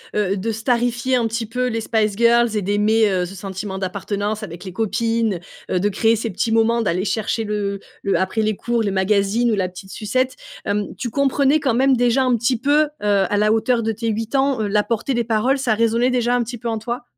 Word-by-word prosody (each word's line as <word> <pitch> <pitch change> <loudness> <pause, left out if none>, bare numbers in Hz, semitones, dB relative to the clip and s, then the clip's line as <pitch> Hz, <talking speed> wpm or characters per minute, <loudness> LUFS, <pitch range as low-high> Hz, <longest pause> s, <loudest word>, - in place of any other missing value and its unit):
heu, 200 -1 +1
de 225 +4 -2
starifier 240 +2 0
un 230 - +1
petit 225 +1 -3
peu 250 +3 -2
les 225 -1 -2
Spice 215 -2 0
Girls 235 0 +3
et 210 - +1
d'aimer, 210 +3 +2
heu, 180 -1 0
ce 185 +3 -9
sentiment 190 +1 -5
d'appartenance 205 +3 -3
avec 170 -3 -8
les 190 - -7
copines, 225 -1 -1 0.3
heu, 180 - +1
de 205 - +1
créer 225 +3 +2
ces 225 +1 -3
petits 215 +4 -2
moments, 230 +1 +3
d'aller 185 -3 0
chercher 215 +2 -1
le 205 -2 -2 0.2
le 200 - +1
après 190 +4 0
les 215 -1 0
cours, 235 +1 -1
le 205 - 0
magazine 200 +4 +1
ou 215 - +2
la 185 -2 0
petite 190 +2 -11
sucette, 255 +4 -1 0.3
hem, 205 0 -2
tu 255 -3 -4
comprenais 280 +3 +2
quand 265 -5 0
même 265 +2 +3
déjà 245 +2 +3
un 255 - +2
petit 240 +2 +1
peu, 290 +5 +3
heu, 305 - -2
à 205 -1 +2
la 210 +1 +3
hauteur 230 +2 +1
de 225 - 0
tes 225 +2 -4
8 225 +3 -3
ans, 270 -3 +2
heu, 210 - 0
la 210 +1 +2
portée 235 +4 -2
des 235 -1 0
paroles, 230 +5 +1
ça 255 -5 +1
résonnait 230 +3 +2
déjà 245 -1 +1
un 245 - +1
petit 240 +2 -6
peu 235 +1 -4
en 225 - -1
toi? 240 +3 -4
225 Hz, 235 wpm, -20 LUFS, 205-240 Hz, 0.3 s, Girls